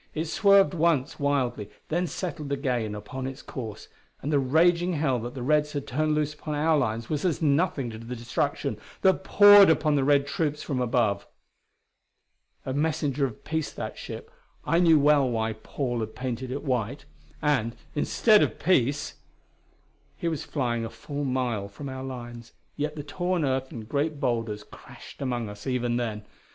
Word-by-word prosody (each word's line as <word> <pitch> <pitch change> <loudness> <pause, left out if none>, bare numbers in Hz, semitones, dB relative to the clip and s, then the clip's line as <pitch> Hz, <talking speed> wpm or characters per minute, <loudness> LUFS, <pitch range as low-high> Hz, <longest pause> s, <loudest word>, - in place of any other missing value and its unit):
It 160 +1 -1
swerved 200 +3 +4
once 160 -5 +1
wildly, 130 -7 0 0.2
then 175 +3 0
settled 155 -5 -5
again 125 -6 -1
upon 130 +6 -6
its 135 +1 -8
course, 110 -5 -7 0.4
and 150 +3 -1
the 145 - +4
raging 170 +6 +3
hell 145 -5 +1
that 120 +3 -6
the 125 - -5
Reds 150 +2 +2
had 145 -2 -3
turned 155 +4 0
loose 150 0 0
upon 150 0 -5
our 155 +2 +3
lines 115 -5 -1
was 150 -2 -2
as 175 -5 +1
nothing 145 -4 +1
to 110 - -8
the 115 +2 -6
destruction 120 0 -2 0.2
that 190 0 +4
poured 205 -1 +8
upon 155 -1 +3
the 140 -2 +2
Red 140 0 +4
troops 150 -1 -2
from 135 -4 -2
above. 115 -5 +1 1.4
A 130 - -2
messenger 145 -2 0
of 110 - -12
peace, 160 -1 -2
that - - -5
ship; - - -8 0.3
I 165 - +3
knew 165 -3 +6
well 145 -2 +4
why 110 -1 -1
Paul 120 +3 -3
had 110 -1 -4
painted 125 0 -4
it 140 +3 -4
white. 130 0 -2 0.3
And, 125 -6 +1 0.2
instead 210 +8 +4
of - - 0
peace! 145 -5 +1 1.0
He 170 - -3
was 160 -4 -2
flying 120 -5 -1
a 115 - -4
full 140 +6 -5
mile 125 -6 -1
from 135 +8 -8
our 130 0 -6
lines, 120 -3 -8 0.2
yet 150 +1 -2
the 150 - -5
torn 175 +2 -1
earth 130 0 -1
and 110 -3 -8
great 145 +3 -1
boulders 115 -5 -1
crashed - - -13
among 120 -4 -2
us 105 +5 -9
even 120 -2 0
then. 110 -3 -3
140 Hz, 175 wpm, -27 LUFS, 120-155 Hz, 1.4 s, poured